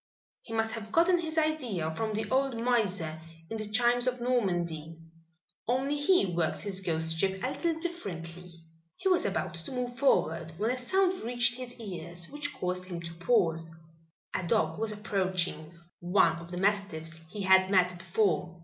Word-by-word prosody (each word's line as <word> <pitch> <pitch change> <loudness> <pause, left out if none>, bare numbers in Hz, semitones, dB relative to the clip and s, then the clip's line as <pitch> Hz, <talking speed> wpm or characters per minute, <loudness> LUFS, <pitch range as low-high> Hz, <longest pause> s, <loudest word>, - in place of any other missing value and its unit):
He - - -13
must 225 0 0
have 220 -1 -6
gotten 345 +4 +4
his 320 -1 -3
idea 245 - 0
from 220 +5 -2
the 215 0 -2
old 265 -2 +1
miser 200 -10 0 0.3
in 225 - -2
the 215 -1 -5
'Chimes 240 +3 +3
of 250 0 0
Normandy,' 175 -10 -1 0.7
only 260 +4 +1
he 290 - +4
works 170 -3 0
his 195 -2 -1
ghostship 165 +3 +1
a 255 - +1
little 330 +3 -1
differently." 180 - -5 0.4
He - - -2
was 365 - +3
about 210 +3 -1
to 170 +5 -6
move 250 -1 -3
forward 165 - +2
when 220 +5 +1
a 255 - -1
sound 375 +7 +1
reached 240 +1 +1
his 250 -1 -8
ears 175 -4 -6
which 290 0 -3
caused 180 0 -2
him 180 -2 -5
to 170 0 -7
pause. 165 -4 +1 0.6
A - - 0
dog 210 +6 +1
was 220 -1 0
approaching 185 -6 -2 0.3
one 175 -1 +3
of 170 0 -10
the 180 - -5
mastiffs 185 -5 -1
he 205 +2 -5
had 190 0 +5
met 180 -2 +3
before. 180 -2 0
200 Hz, 165 wpm, -30 LUFS, 170-245 Hz, 0.7 s, had